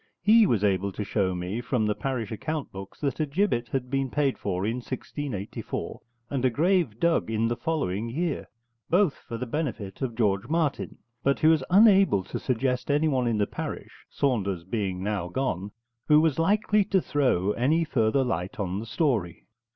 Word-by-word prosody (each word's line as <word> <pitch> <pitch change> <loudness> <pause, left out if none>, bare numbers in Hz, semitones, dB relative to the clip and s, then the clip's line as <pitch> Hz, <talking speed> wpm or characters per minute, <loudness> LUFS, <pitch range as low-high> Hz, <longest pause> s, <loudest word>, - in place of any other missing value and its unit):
He 220 0 +6
was 110 - +1
able 100 -1 +1
to 105 - -3
show 95 -3 0
me 90 +6 -3
from 120 -2 0
the 105 - +1
parish 120 -3 -3
account 155 +6 -4
books 95 0 -9
that 140 0 -1
a 155 - +1
gibbet 145 -6 0
had 125 -2 -3
been 135 -1 0
paid 140 0 +1
for 95 -1 -2
in 115 +3 -1
1684, 125 -3 -5 0.3
and 135 -3 -1
a 130 - +4
grave 160 - +1
dug 170 -8 +2
in 115 0 +1
the 120 - -1
following 115 - -2
year, 160 +5 -2 0.4
both 180 -3 +3
for 115 - -8
the 125 - -3
benefit 120 -8 -4
of 125 -4 -2
George 105 -2 +1
Martin; 160 -3 -1 0.2
but 140 +1 +1
he - - +2
was 160 -3 +4
unable 195 - +5
to - - -5
suggest 125 +1 -1
anyone 145 -4 +2
in 115 -2 +1
the 105 - +2
parish, - - -7
Saunders 100 -10 -1
being 95 -1 -3
now 100 -4 -2
gone, 100 -2 -2 0.4
who 150 -1 +6
was 160 -2 +2
likely 210 +4 +3
to 195 -1 +2
throw 125 - +1
any 145 +10 +2
further 135 -3 +1
light 95 -5 -3
on 95 -1 -2
the 115 - -7
story. 115 - -1
125 Hz, 180 wpm, -26 LUFS, 105-150 Hz, 0.4 s, He